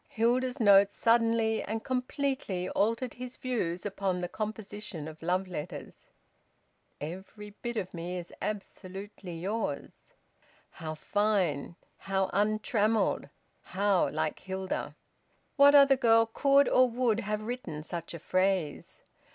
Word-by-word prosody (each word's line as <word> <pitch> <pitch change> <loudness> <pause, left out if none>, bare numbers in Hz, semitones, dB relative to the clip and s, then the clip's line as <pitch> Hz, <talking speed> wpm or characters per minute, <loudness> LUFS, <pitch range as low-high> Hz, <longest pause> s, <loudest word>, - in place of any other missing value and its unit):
Hilda's 250 +4 +1
note 200 -2 +6
suddenly 230 0 +2
and 220 +1 -4
completely 255 -7 -2
altered 230 +4 0
his 250 0 -8
views 200 -9 -2
upon 195 -2 -1
the 180 0 -2
composition 210 -5 -5
of 160 0 -10
love 180 +3 0
letters. 175 -2 -7 0.9
"Every 190 +7 -8
bit 240 -1 -3
of 185 -3 -3
me 175 +1 -4
is 175 -1 -8
absolutely 195 -3 -6
yours." 190 -4 -4 0.6
How 155 -1 -6
fine, 180 -4 0 0.2
how 190 -1 -1
untrammelled, 215 +1 +1 0.3
how 195 0 +1
like 155 0 -2
Hilda! 190 0 -4 0.6
What 285 0 +7
other 275 -1 +7
girl 225 -2 +5
could 275 +5 +4
or 255 0 +5
would 235 -2 +1
have 210 -1 -2
written 200 -11 -5
such 170 +1 -6
a - - -7
phrase? 185 -3 -1
205 Hz, 120 wpm, -30 LUFS, 180-230 Hz, 0.9 s, What